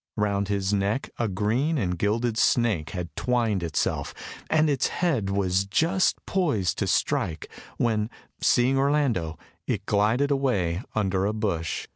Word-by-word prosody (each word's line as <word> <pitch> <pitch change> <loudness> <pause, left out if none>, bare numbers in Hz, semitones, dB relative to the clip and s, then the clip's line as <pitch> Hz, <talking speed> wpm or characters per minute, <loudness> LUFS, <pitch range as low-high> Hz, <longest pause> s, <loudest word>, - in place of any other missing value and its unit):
Round 100 -1 0
his 100 0 0
neck 100 +6 0
a 120 - +1
green 110 - 0
and 90 -7 0
gilded 110 +5 0
snake 110 -9 +2
had 85 -4 -6
twined 115 -6 0
itself, 85 -3 -2 0.3
and 155 0 +3
its 140 -5 +1
head 140 - 0
was 95 -1 +1
just 165 - +2
poised 145 - 0
to - - 0
strike, 80 -1 0 0.3
when, 110 -2 +1 0.3
seeing 130 +2 +3
Orlando, 135 - +1 0.3
it - - -2
glided 110 +8 +2
away 100 -11 0
under 95 -2 +1
a 105 - -1
bush. 100 -7 -2
105 Hz, 140 wpm, -26 LUFS, 95-130 Hz, 0.3 s, and